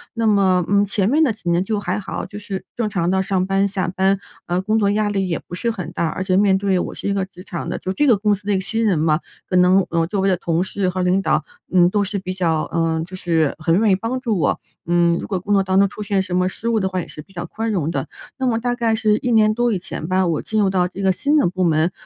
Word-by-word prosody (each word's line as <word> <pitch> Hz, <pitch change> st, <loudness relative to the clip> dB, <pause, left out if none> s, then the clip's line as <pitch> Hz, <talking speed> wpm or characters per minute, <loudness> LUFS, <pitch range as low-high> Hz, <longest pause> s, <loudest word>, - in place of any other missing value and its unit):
那 230 Hz, -1 st, +1 dB
么， 190 Hz, -4 st, +3 dB
嗯， 200 Hz, 0 st, +3 dB
前 200 Hz, 0 st, 0 dB
面 305 Hz, +5 st, +3 dB
的 280 Hz, -, +3 dB
几 210 Hz, -5 st, -5 dB
年 170 Hz, +1 st, +2 dB
就 210 Hz, +1 st, -1 dB
还 195 Hz, 0 st, -2 dB
好， 200 Hz, -, -5 dB
就 205 Hz, -, -8 dB
是 200 Hz, -2 st, -6 dB
正 230 Hz, -3 st, -1 dB
常 175 Hz, -5 st, -1 dB
地 190 Hz, 0 st, +2 dB
上 190 Hz, -1 st, 0 dB
班、 195 Hz, +1 st, +2 dB
下 190 Hz, -3 st, -2 dB
班， 190 Hz, +2 st, +1 dB, 0.3 s
呃， 175 Hz, +1 st, 0 dB
工 215 Hz, +3 st, +1 dB
作 200 Hz, -2 st, +2 dB
压 210 Hz, 0 st, +1 dB
力 195 Hz, -2 st, -1 dB
也 170 Hz, -, 0 dB
不 -, -, -12 dB
是 235 Hz, +6 st, -1 dB
很 195 Hz, -7 st, -5 dB
大， 170 Hz, -, -1 dB
而 175 Hz, +4 st, -3 dB
且 185 Hz, -1 st, +1 dB
面 195 Hz, -1 st, +4 dB
对 190 Hz, -2 st, +1 dB
我 -, -, -4 dB
是 -, -, -5 dB
一 200 Hz, -, +1 dB
个 195 Hz, -1 st, 0 dB
职 185 Hz, -1 st, -14 dB
场 170 Hz, -2 st, -5 dB
的 -, -, -2 dB
就 185 Hz, -, -4 dB
这 295 Hz, +8 st, +2 dB
个 235 Hz, -5 st, +5 dB
公 210 Hz, +1 st, +2 dB
司 200 Hz, 0 st, -5 dB
的 205 Hz, -, +2 dB
一 -, -, +2 dB
个 190 Hz, -, 0 dB
新 225 Hz, +4 st, -2 dB
人 200 Hz, -6 st, +2 dB
嘛， 155 Hz, 0 st, +2 dB, 0.3 s
可 185 Hz, -, -2 dB
能， 180 Hz, +1 st, +5 dB
呃， 165 Hz, -1 st, +1 dB
周 195 Hz, +2 st, -1 dB
围 195 Hz, -, +2 dB
的 185 Hz, -, +3 dB
同 170 Hz, +1 st, 0 dB
事 190 Hz, 0 st, -1 dB
和 185 Hz, 0 st, -2 dB
领 185 Hz, +2 st, +2 dB
导， 155 Hz, -5 st, 0 dB, 0.3 s
嗯， 180 Hz, -1 st, +5 dB
都 205 Hz, 0 st, +1 dB
是 200 Hz, +1 st, -3 dB
比 185 Hz, -1 st, -4 dB
较， 165 Hz, -4 st, 0 dB
嗯， 165 Hz, -1 st, 0 dB
就 185 Hz, +2 st, -9 dB
是 165 Hz, -5 st, 0 dB
很 165 Hz, +3 st, +2 dB
愿 215 Hz, -2 st, +3 dB
意 -, -, +5 dB
帮 230 Hz, +6 st, -3 dB
助 230 Hz, -7 st, -1 dB
我。 155 Hz, -, +1 dB, 0.3 s
嗯， 170 Hz, 0 st, +3 dB
如 -, -, -6 dB
果 190 Hz, -3 st, -2 dB
工 200 Hz, +3 st, -1 dB
作 200 Hz, -, +4 dB
当 190 Hz, 0 st, +2 dB
中 200 Hz, -, +5 dB
出 210 Hz, -, -9 dB
现 200 Hz, -2 st, 0 dB
什 185 Hz, -1 st, -3 dB
么 180 Hz, 0 st, +2 dB
失 225 Hz, -, -6 dB
误 225 Hz, -1 st, +2 dB
的 190 Hz, -2 st, 0 dB
话 185 Hz, 0 st, -2 dB
也 -, -, -8 dB
是 150 Hz, -, -9 dB
比 160 Hz, -, -20 dB
较 175 Hz, -1 st, -5 dB
宽 225 Hz, +6 st, -3 dB
容 170 Hz, -7 st, -1 dB
的。 135 Hz, -5 st, -3 dB, 0.3 s
那 260 Hz, -1 st, -1 dB
么 230 Hz, -2 st, +1 dB
大 245 Hz, +1 st, -1 dB
概 230 Hz, -2 st, +1 dB
是 215 Hz, -1 st, +2 dB
1 245 Hz, -, -2 dB
年 215 Hz, -1 st, +4 dB
多 240 Hz, +1 st, +1 dB
以 205 Hz, -, +1 dB
前 160 Hz, -2 st, -6 dB
吧， 185 Hz, +1 st, +2 dB
我 165 Hz, -3 st, 0 dB
进 220 Hz, -, -2 dB
入 200 Hz, -2 st, +3 dB
到 180 Hz, -2 st, +2 dB
这 190 Hz, +2 st, -8 dB
个 190 Hz, -, +4 dB
新 290 Hz, +10 st, +1 dB
的 290 Hz, -, +3 dB
部 185 Hz, +1 st, -1 dB
门， 165 Hz, 0 st, +2 dB
190 Hz, 325 characters per minute, -20 LUFS, 180-210 Hz, 0.3 s, 个